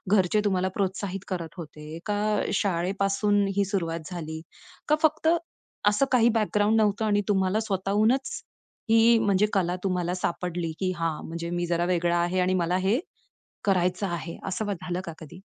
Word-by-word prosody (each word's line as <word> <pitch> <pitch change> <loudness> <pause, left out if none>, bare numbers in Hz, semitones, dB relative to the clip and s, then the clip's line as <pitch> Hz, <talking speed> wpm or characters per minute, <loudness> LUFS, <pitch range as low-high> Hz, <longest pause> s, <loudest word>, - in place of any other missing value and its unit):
घरचे 190 +2 +3
तुम्हाला 185 -2 +1
प्रोत्साहित 195 -1 -2
करत 170 -4 -4
होते, 155 -1 -8
का 210 0 0
शाळेपासून 195 +2 +1
ही 200 - +3
सुरुवात 170 -4 -2
झाली? 160 -2 -5 0.5
का 305 - +4
फक्त 310 +1 +2 0.6
असं 210 +6 +2
काही 240 -2 +5
बॅकग्राऊंड 215 -1 +2
नव्हतं 210 +1 +1
आणि 205 -1 +2
तुम्हाला 195 0 +2
स्वतःहूनच 215 +5 0 0.5
ही 230 +1 +6
म्हणजे 205 -2 +3
कला 180 -2 +1
तुम्हाला 180 -2 0
सापडली, 175 -2 -2
की 185 -1 0
हां, 165 -2 -2
म्हणजे 170 +1 -5
मी 175 0 -1
जरा 170 0 0
वेगळा 175 -1 +1
आहे 175 +2 +1
आणि 180 +1 +2
मला 180 0 +1
हे 195 +6 +2 0.6
करायचं 185 0 +1
आहे. 170 -1 -5
असं 195 +3 -2
मग 205 - -1
झालं 180 0 -3
का 165 - -6
कधी? 160 0 -11
190 Hz, 160 wpm, -26 LUFS, 175-205 Hz, 0.6 s, ही